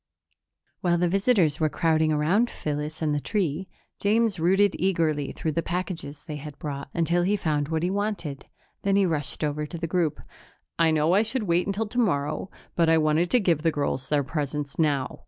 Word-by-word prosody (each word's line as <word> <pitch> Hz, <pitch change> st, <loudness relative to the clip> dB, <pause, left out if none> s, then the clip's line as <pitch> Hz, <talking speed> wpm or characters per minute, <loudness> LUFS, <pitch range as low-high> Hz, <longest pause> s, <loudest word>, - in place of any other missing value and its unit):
While 175 Hz, -1 st, +2 dB
the 175 Hz, +1 st, +2 dB
visitors 190 Hz, -, +2 dB
were 155 Hz, -1 st, +2 dB
crowding 160 Hz, 0 st, +2 dB
around 175 Hz, +11 st, +2 dB
Phyllis 150 Hz, +1 st, -4 dB
and 150 Hz, -1 st, +1 dB
the 145 Hz, -, +1 dB
tree, 185 Hz, 0 st, -1 dB, 0.3 s
James 210 Hz, -2 st, +2 dB
rooted 190 Hz, +4 st, +3 dB
eagerly 160 Hz, -6 st, +1 dB
through 160 Hz, -, -3 dB
the 165 Hz, -, 0 dB
packages 170 Hz, -4 st, -4 dB
they 150 Hz, -3 st, -5 dB
had 145 Hz, 0 st, -9 dB
brought, 140 Hz, -2 st, -5 dB
until 170 Hz, +2 st, +1 dB
he 195 Hz, +4 st, +2 dB
found 150 Hz, -7 st, 0 dB
what 160 Hz, +1 st, -1 dB
he 180 Hz, -, +1 dB
wanted. 200 Hz, -8 st, -3 dB, 0.3 s
Then 195 Hz, -1 st, +1 dB
he 200 Hz, -1 st, +4 dB
rushed 150 Hz, -6 st, -2 dB
over 150 Hz, 0 st, -1 dB
to 170 Hz, -, -7 dB
the 165 Hz, -, -3 dB
group. 165 Hz, -2 st, 0 dB, 0.6 s
"I 165 Hz, -1 st, +5 dB
know 155 Hz, +2 st, +2 dB
I 200 Hz, -, +5 dB
should 225 Hz, +2 st, -2 dB
wait 175 Hz, -1 st, +1 dB
until 200 Hz, +3 st, -1 dB
tomorrow, 180 Hz, -9 st, 0 dB, 0.3 s
but 165 Hz, -1 st, +3 dB
I 165 Hz, -, +5 dB
want 155 Hz, +2 st, +2 dB
to 250 Hz, -, +4 dB
give 170 Hz, -7 st, +2 dB
the 165 Hz, -, +3 dB
girls 140 Hz, -4 st, -2 dB
their 145 Hz, -1 st, +2 dB
presents 145 Hz, 0 st, -4 dB
now." 145 Hz, -5 st, 0 dB
165 Hz, 195 wpm, -26 LUFS, 150-190 Hz, 0.6 s, I